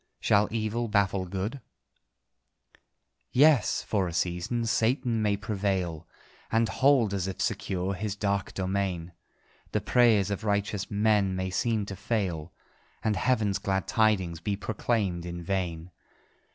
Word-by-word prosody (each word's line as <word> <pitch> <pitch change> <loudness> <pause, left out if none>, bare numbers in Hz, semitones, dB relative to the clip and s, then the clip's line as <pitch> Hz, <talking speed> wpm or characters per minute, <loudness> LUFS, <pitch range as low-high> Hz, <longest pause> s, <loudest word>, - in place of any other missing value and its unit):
Shall 105 +1 +3
EVIL 115 +1 -1
baffle 100 -3 +1
GOOD?" 100 +9 -4 1.7
Yes 140 -3 +4
for 100 -4 0
a 85 - -5
season 90 +7 -1
Satan 115 +1 +1
may 105 -1 +1
prevail, 95 -6 -2 0.4
And 115 0 +3
hold, 130 -6 +3
as 95 -2 -1
if 95 - -5
secure, 95 -3 -1
his 100 +1 -3
dark 100 -1 -1
domain; 95 -3 -2 0.6
The - - +1
prayers 110 -5 +4
of 100 +2 -3
righteous 100 -1 -1
men 105 -2 +2
may 95 0 -2
seem 110 +2 0
to 100 - -6
fail, 95 -6 -2 0.5
And 110 -2 +1
Heaven's 105 -2 +1
glad 95 -2 -1
tidings 95 -7 +2
be 100 +4 -2
proclaimed 105 -4 -1
in 85 0 -6
vain. 90 -2 -3
100 Hz, 130 wpm, -28 LUFS, 95-110 Hz, 1.7 s, Yes